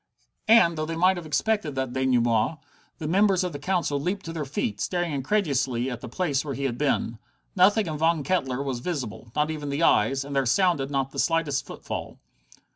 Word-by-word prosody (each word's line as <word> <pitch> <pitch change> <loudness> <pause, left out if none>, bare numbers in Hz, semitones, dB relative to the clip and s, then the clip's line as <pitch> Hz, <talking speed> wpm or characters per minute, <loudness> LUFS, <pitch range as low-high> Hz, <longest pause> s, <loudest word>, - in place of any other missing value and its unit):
And, 215 -7 +6
though 155 - -2
they 165 - -3
might 185 +3 +3
have 170 -2 -7
expected 155 +1 0
that 130 -2 -2
denouement, 125 +1 +2 0.4
the 155 - -5
members 190 +2 +3
of 180 -3 -3
the 145 - -6
Council 170 -3 0
leaped 190 +6 -2
to 165 - -5
their 155 -3 -3
feet, 110 -7 -3
staring 175 -3 -1
incredulously 135 - 0
at 120 -1 -6
the 125 - -7
place 145 -1 -1
where 140 -3 -4
he 140 - -4
had 130 -3 -1
been. 120 -4 -1 0.4
Nothing 205 +2 +4
of 155 -2 -4
Von 160 -1 +2
Kettler 135 -6 -1
was 130 -3 -3
visible, 120 -7 -5
not 150 +1 +1
even 150 -2 -5
the 140 +4 -1
eyes, 135 +1 +3
and 140 0 -6
there 135 -2 +2
sounded 145 -1 +2
not 135 -1 -1
the - - -5
slightest 160 -5 0
footfall. - - -6
145 Hz, 200 wpm, -26 LUFS, 135-175 Hz, 0.4 s, And